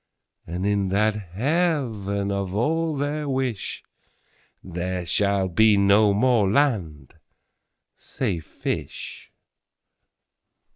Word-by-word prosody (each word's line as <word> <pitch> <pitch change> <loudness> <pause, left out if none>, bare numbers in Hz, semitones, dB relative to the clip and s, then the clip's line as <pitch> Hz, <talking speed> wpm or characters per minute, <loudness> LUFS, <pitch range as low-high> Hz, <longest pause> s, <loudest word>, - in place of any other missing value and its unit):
33And 90 +3 -3
in 100 -1 +1
that 105 +3 +2
Heaven 105 - -1
of 100 -1 -3
all 160 +7 0
their 145 +1 -2
wish,34There 95 -7 -5
shall 100 -1 +1
be 105 +4 +4
no 100 +1 +5
more 110 -1 +3
land, 95 - 0 0.8
say 100 -10 -3
fish. 80 - -6
100 Hz, 85 wpm, -24 LUFS, 95-130 Hz, 0.8 s, no